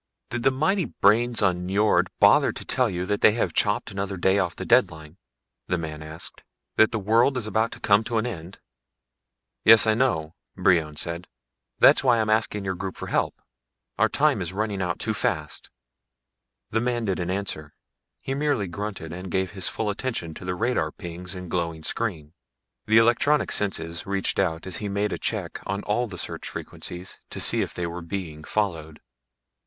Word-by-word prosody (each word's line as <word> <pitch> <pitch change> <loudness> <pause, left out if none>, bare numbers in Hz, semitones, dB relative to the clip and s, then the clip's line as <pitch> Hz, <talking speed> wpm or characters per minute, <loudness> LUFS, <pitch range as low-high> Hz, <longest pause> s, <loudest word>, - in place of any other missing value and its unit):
"Did 120 - -2
the 135 - +4
mighty 155 +8 +1
brains 115 +3 +2
on 90 -2 +1
Nyjord 105 +3 +2
bother - - +6
to - - -8
tell 130 -3 +2
you 90 -2 -3
that 105 +1 -1
they 105 - +6
have 115 - -1
chopped 105 +1 +1
another 100 0 -3
day 95 +3 +3
off 90 -3 -1
the - - -6
deadline?" 80 +1 +2 0.5
the 90 - 0
man 80 -2 -5
asked. 80 +2 -6 0.3
"That 110 - +5
this 110 - -1
world 115 +6 +3
is 120 - -2
about 110 +1 0
to - - -10
come 100 +1 +4
to 120 -1 -1
an 110 - +1
end?" 95 -6 -6 1.1
"Yes, 110 0 +8
I 110 - +4
know," 110 -10 0 0.2
Brion 80 -5 +2
said. 85 +3 -3 0.5
"That's - - +6
why 125 -3 +4
I'm 110 -1 +1
asking 110 -2 +1
your 95 - -1
group 95 0 -6
for - - -6
help. - - 0 0.6
Our - - +4
time - - +2
is 90 +1 -3
running 105 -1 -2
out 90 -1 -1
too - - -2
fast." - - -2 1.0
The 110 - +1
man 120 -1 -1
didn't 90 -3 -1
answer; 95 -6 -4 0.5
he 135 - -3
merely 140 -6 0
grunted 95 -3 -5
and 90 +2 -7
gave 95 0 -1
his 95 -2 0
full 110 -2 -2
attention 100 -7 -4
to 90 - -10
the 90 0 -2
radar 120 +6 0
pings 90 0 -7
and 90 0 -7
glowing 85 -2 -2
screen. 80 -10 -3 0.5
The 110 +1 +5
electronic 120 +6 +3
senses 85 -4 -1
reached 100 0 -1
out 80 -4 0
as 95 - -2
he 105 - -4
made 100 +1 -1
a - - -4
check - - -2
on 100 +1 -2
all 120 +4 0
the 95 -5 -8
search - - -4
frequencies 90 +1 -5
to - - -6
see - - +4
if - - -4
they 90 - -2
were 85 +1 -5
being 85 -3 -6
followed. 80 -6 -2
100 Hz, 190 wpm, -25 LUFS, 85-110 Hz, 1.1 s, Yes